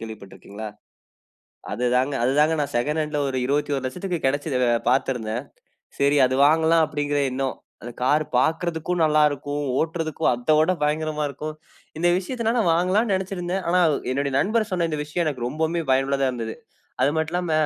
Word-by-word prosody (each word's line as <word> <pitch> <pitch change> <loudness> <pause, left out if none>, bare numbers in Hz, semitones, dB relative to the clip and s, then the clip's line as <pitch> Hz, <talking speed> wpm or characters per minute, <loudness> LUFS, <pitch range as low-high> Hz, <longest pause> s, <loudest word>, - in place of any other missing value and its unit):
கேள்விப்பட்டிருக்கிங்களா? 110 -1 -9 1.0
அதுதாங்க, 125 +4 +1
அதுதாங்க 150 +5 +3
நான் 145 -2 -3
செகண்ட் 150 +6 0
ஹேண்ட்ல 150 -1 -2
ஒரு 130 - -3
21 140 -1 0
லட்சத்துக்கு 180 +5 -3
கிடைச்சுது 145 +1 -1 0.3
பார்த்திருந்தேன். 125 -3 -1 0.6
சரி 140 +1 +3
அது 130 - -1
வாங்கலாம் 160 +1 +4
அப்படிங்கிற 145 -1 -1
எண்ணம். 130 +1 -2 0.3
அந்த 120 - -7
கார் 145 +5 +3 0.2
பார்க்கறதுக்கும் 165 +3 0
நல்லா 155 -1 +3
இருக்கும். 145 +1 -4 0.2
ஓட்டுறதக்கும் 160 -2 -1
அத 125 +6 +1
விட 160 +4 +3
பயங்கரமா 150 0 0
இருக்கும். 150 +3 -6 0.4
இந்த 175 - +2
விஷயத்தனால 230 +5 -1
நான் 175 -8 +3
வாங்கலாம்ன்னு 195 +5 +2
நெனைச்சிருந்தேன். 185 -1 -3
ஆனா 180 +1 +3
அ - - +1 0.2
என்னுடைய 140 +1 -1
நண்பர் 215 +4 +1
சொன்ன 180 -3 0
இந்த 150 - -2
விஷயம் 165 +3 -2
எனக்கு 130 -6 -2
ரொம்பவுமே 160 +5 -1
பயனுள்ளதா 135 +1 +2
இருந்தது. 115 -3 -5 0.5
அது 140 - +4
மட்டும் 160 0 -1
இல்லாம 180 -2 -1
150 Hz, 155 wpm, -23 LUFS, 135-170 Hz, 1.0 s, வாங்கலாம்